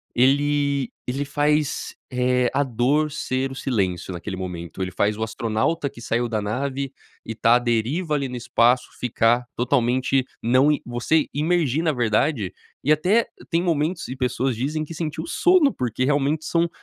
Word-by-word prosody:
Ele 140 +1 +2 0.2
ele 135 +3 -1
faz, 150 +1 0 0.2
eh, 125 0 +2
a 145 - +2
dor 135 +5 +1
ser 135 -3 -2
o - - -7
silêncio, 95 -9 -1
naquele 95 +3 -5
momento, 90 -1 -6
ele 95 0 -2
faz 105 +4 +1
o 110 - -2
astronauta 115 +7 -1
que 120 - -13
saiu 120 +1 0
da 110 -2 -1
nave 135 +5 -2 0.3
e, 115 - -4
tá 115 +2 +4
à - - +4
deriva, 125 +8 0
ali, 140 -2 -1
no 125 - -6
espaço 120 +1 +2
ficar, 120 0 +2
totalmente, 130 +1 +1 0.2
não 130 +5 +4
i 150 - 0
você 120 +6 +1
imergir 155 -1 +1
na 155 -2 +2
verdade, 115 - +1 0.3
e, 150 - +2
até 185 +10 +3 0.2
tem 170 +1 +1
momentos, 165 0 0
e 130 - -4
pessoas 125 0 0
dizem 150 +5 -1
que 165 - -8
sentiu 160 -2 -4
sono, 355 -6 +4
porque, 125 0 -2
realmente, 145 +2 +1
são 170 0 +1
130 Hz, 170 wpm, -23 LUFS, 120-150 Hz, 0.3 s, tá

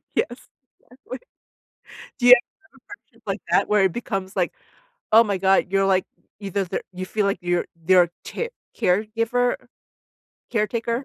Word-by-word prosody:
right, - - -53
yes, - - +2 0.6
exactly. 275 - -10 1.0
Do 245 - 0
you 250 - +12
have 245 - +6 0.3
some 270 - -21
friendship 405 - -15
like - - -2
that, - - +3
where 210 -2 +4
it 185 - +2
becomes, 195 -5 -4
like, 180 -2 +1 0.6
oh 225 - +9
my 200 -2 -1
god, 190 +1 +3
you're, 195 0 +2
like, 190 -1 +3 0.4
either 195 0 -2
their 175 - -3
you 185 +1 -5
feel 210 +1 -1
like 200 - 0
you're 175 0 0
their 175 +1 +4
tear 470 0 -4 0.3
caregiver? 230 +6 +1 0.9
Caretaker? 235 +3 -1
200 Hz, 160 wpm, -23 LUFS, 190-235 Hz, 1.0 s, you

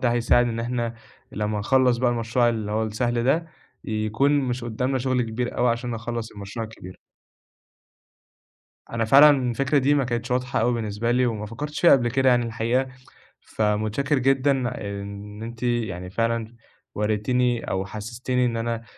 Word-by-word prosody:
ده 120 -2 +2
هيساعد 120 0 +3
إن 115 0 -3
احنا 120 -1 -2 0.4
لمّا 105 0 -2
نخلّص 125 +3 +3
بقى 120 0 +2
المشروع 120 +1 +1
اللي 110 -3 -2
هو 110 +1 0
السهل 120 +2 -1
ده، 165 +5 +2 0.4
يكون 110 +6 0
مش 125 -2 -2
قدامنا 125 +3 -1
شغل 130 0 0
كبير 120 +2 -3
أوي 125 0 +3
عشان 120 +1 -2
نخلص 115 0 -4
المشروع 100 +3 -6
الكبير. 95 -4 -12 1.9
أنا 115 -1 -1
فعلًا 140 +6 +8 0.2
الفكرة 140 +4 +1
دي 140 +2 +3
ما 140 -2 +2
كانتش 120 +1 -3
واضحة 125 0 0
أوي 120 +2 +2
بالنسبة 110 +1 -2
لي، 125 +1 +3
وما 105 -2 -3
فكرتش 150 +7 -5
فيها 175 - +7
قبل 120 -3 +4
كده 130 +1 +2
يعني 120 -1 +3
الحقيقة. 115 +4 0 0.6
فمتشكر 110 +7 0
جدًا 135 +2 +3 0.5
إن 105 +2 -8
أنتِ 115 +1 -8
يعني 105 -7 -2
فعلًا 115 +2 -2 0.4
وريتيني 115 +3 0
أو 95 0 -1
حسّستيني 120 +5 -2
إن 115 -1 -1
أنا 115 0 -2
120 Hz, 160 wpm, -24 LUFS, 110-125 Hz, 1.9 s, فعلًا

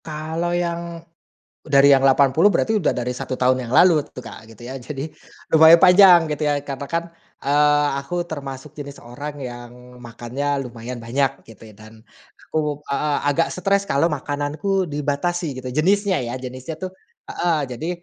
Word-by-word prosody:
Kalau 160 +2 -4
yang, 170 -1 -4 0.6
dari 140 -1 +4
yang 135 - +5
80 135 +6 +4
berarti 215 +3 +1
udah 170 - 0
dari 125 0 -2
1 130 0 -5
tahun 130 0 +2
yang - - -7
lalu 175 -4 +6
tuh 125 - -11
Kak 110 -1 -11
gitu 115 +1 -14
ya 130 +2 -7
jadi, 140 +4 -6 0.4
lumayan 160 +1 +8
panjang 180 0 +7
gitu 150 0 -1
ya 145 -1 -1
katakan, 145 +5 -4 0.3
eee, 145 +1 +3
aku 175 +5 -3
termasuk 140 -3 -8
jenis 140 -1 -9
orang 145 +5 -7
yang 125 0 -11
makannya 130 +4 -4
lumayan 120 0 -8
banyak 135 +4 -2
gitu 110 0 -15
ya 105 - -15
dan 110 +1 -15 0.5
aku, 150 -2 -2
heeh, 145 +1 0
agak 155 +3 +1
stres 200 +2 0
kalau 165 -3 +1
makananku 150 +6 -2
dibatasi 150 0 -2
gitu 130 - -7
jenisnya 190 +8 +1
ya 120 +2 -5
jenisnya 130 +5 -8
tuh, 185 - -3 0.4
heeh, 170 -3 0 0.2
jadi, 160 +8 -5
145 Hz, 160 wpm, -21 LUFS, 130-165 Hz, 0.6 s, lumayan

